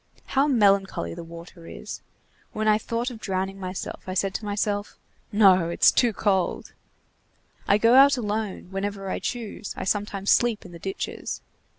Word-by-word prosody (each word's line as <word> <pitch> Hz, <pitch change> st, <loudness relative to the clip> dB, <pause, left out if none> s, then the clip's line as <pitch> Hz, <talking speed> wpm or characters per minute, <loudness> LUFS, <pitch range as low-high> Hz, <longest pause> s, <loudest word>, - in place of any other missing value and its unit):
How 275 Hz, +2 st, +2 dB
melancholy 195 Hz, -, +2 dB
the -, -, -8 dB
water 170 Hz, 0 st, -12 dB
is! -, -, -8 dB, 0.5 s
When 215 Hz, 0 st, -1 dB
I 215 Hz, 0 st, +4 dB
thought 235 Hz, +3 st, -3 dB
of 230 Hz, -, -9 dB
drowning 195 Hz, -1 st, -3 dB
myself, 185 Hz, 0 st, -5 dB
I 185 Hz, -, -4 dB
said 195 Hz, 0 st, 0 dB
to 215 Hz, -, -4 dB
myself: 205 Hz, 0 st, -2 dB, 0.3 s
'No, 190 Hz, -5 st, +5 dB
it's 170 Hz, -, +5 dB
too 240 Hz, -2 st, +3 dB
cold.' 190 Hz, -3 st, -1 dB, 0.9 s
I 200 Hz, -, +5 dB
go 230 Hz, +3 st, +4 dB
out 275 Hz, +1 st, +7 dB
alone, 210 Hz, -4 st, -3 dB
whenever 195 Hz, 0 st, -3 dB
I -, -, -2 dB
choose, 225 Hz, -3 st, -5 dB
I -, -, -4 dB
sometimes 200 Hz, 0 st, -1 dB
sleep 235 Hz, -3 st, +2 dB
in 180 Hz, -, -11 dB
the 170 Hz, -, -10 dB
ditches. 195 Hz, +3 st, -5 dB
200 Hz, 165 wpm, -25 LUFS, 190-220 Hz, 0.9 s, out